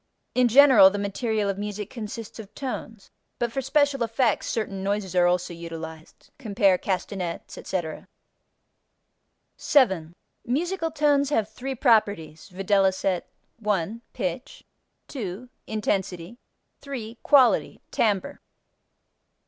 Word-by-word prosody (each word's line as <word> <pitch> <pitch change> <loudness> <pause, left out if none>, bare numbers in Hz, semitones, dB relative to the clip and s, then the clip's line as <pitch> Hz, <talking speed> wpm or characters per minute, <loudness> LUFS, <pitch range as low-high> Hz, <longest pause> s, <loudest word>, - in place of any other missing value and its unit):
In 250 -1 +4
general 245 -6 +8
the 205 - -4
material 205 +1 -1
of 195 0 -2
music 210 -1 -5
consists 225 -1 -7
of 210 -3 -11
tones, 230 -6 -6 0.3
but 240 -1 -1
for 270 - -2
special 280 0 +2
effects 230 -1 +1
certain 200 -4 -3
noises 195 -1 -2
are 175 -1 +5
also 180 0 0
utilized 160 -1 -9
(cf. 200 -6 +2
castanets, 185 -2 -3
etc.). 170 -4 -4 1.5
7. 190 - +2 0.3
Musical 330 +7 -1
tones 290 -3 +2
have 225 -8 +1
three 260 +5 -6
properties, 205 - +1
viz.: 190 -1 +1 0.4
1. 210 0 -1
Pitch. - - -4 0.4
2. 230 -1 -6 0.2
Intensity. 195 -1 -2 0.4
3. 240 -5 -7
Quality 270 -4 +4
(timbre). 205 -4 0
210 Hz, 110 wpm, -25 LUFS, 190-245 Hz, 1.5 s, general